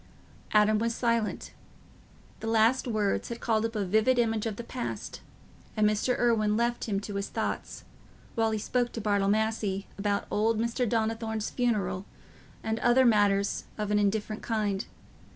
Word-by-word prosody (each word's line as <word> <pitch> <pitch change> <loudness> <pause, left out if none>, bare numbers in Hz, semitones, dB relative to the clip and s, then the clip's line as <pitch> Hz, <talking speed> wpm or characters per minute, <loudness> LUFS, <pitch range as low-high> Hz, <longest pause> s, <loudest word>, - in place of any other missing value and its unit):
Adam 210 0 +4
was 230 +1 0
silent: 230 -3 -1 0.9
the 225 - -5
last 225 +4 +3
words 215 -4 0
had 235 0 -5
called 220 -2 +1
up 225 - -12
a 205 -2 0
vivid 220 +7 +3
image 225 -2 +1
of 215 - -3
the 235 - -6
past, 245 +1 -5 0.6
and 215 0 +4
Mr. 215 +4 +1
Irwine 215 -3 +2
left 235 +1 0
him 200 -2 +1
to 205 - -6
his 200 - -3
thoughts, - - -4 0.5
while 225 -1 +1
he 220 - -1
spoke 240 +3 0
to - - -4
Bartle 200 -2 +1
Massey 215 -2 0
about 200 0 0
old 220 +1 +2
Mr. 235 +1 0
Donnithorne's 220 -1 -1
funeral 200 -6 0 0.6
and 220 0 -1
other 245 +2 +4
matters 205 -3 +3
of 210 -1 -2
an 210 - +3
indifferent 210 +1 -1
kind. 210 -3 -1
220 Hz, 160 wpm, -28 LUFS, 210-230 Hz, 0.9 s, Adam